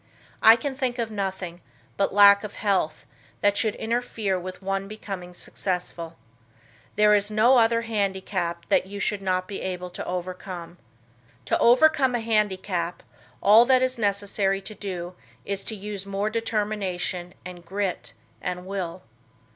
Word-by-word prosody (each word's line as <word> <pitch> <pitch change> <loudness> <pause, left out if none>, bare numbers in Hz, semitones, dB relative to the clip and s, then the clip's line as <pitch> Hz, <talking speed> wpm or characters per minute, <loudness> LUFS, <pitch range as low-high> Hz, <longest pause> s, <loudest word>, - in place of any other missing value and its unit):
I 225 +1 +9
can 270 +4 -3
think 260 -2 -2
of 230 -2 -2
nothing, 190 -4 -4 0.3
but 200 - +1
lack 200 0 +7
of 210 - -7
health, 190 -7 0 0.4
that 205 0 +3
should 215 0 +1
interfere 225 -4 -1
with 185 +1 -8
one 195 0 -2
becoming 195 -4 -7
successful. 175 -3 -4 0.8
There 210 0 +5
is 205 0 +2
no 225 +5 +5
other 230 0 +3
handicap 190 -5 -2
that - - +3
you 200 +1 -7
should 200 0 -1
not 185 -1 0
be 200 - -6
able 180 -1 -4
to - - -6
overcome. 180 -1 -6 0.7
To - - +1
overcome 260 +1 +5
a 240 - -1
handicap, 190 -6 -1 0.4
all 215 +3 +8
that 255 0 +4
it - - +6
is 255 -1 -3
necessary 200 -1 0
to 215 - -8
do 185 -3 -5 0.3
is 195 -1 -3
to 220 - -3
use 200 -1 -6
more 200 +2 -1
determination 205 -5 -2
and 180 -1 -9
grit 175 -10 -3 0.3
and 180 0 -4
will. 185 -2 -4
200 Hz, 150 wpm, -25 LUFS, 180-215 Hz, 0.8 s, I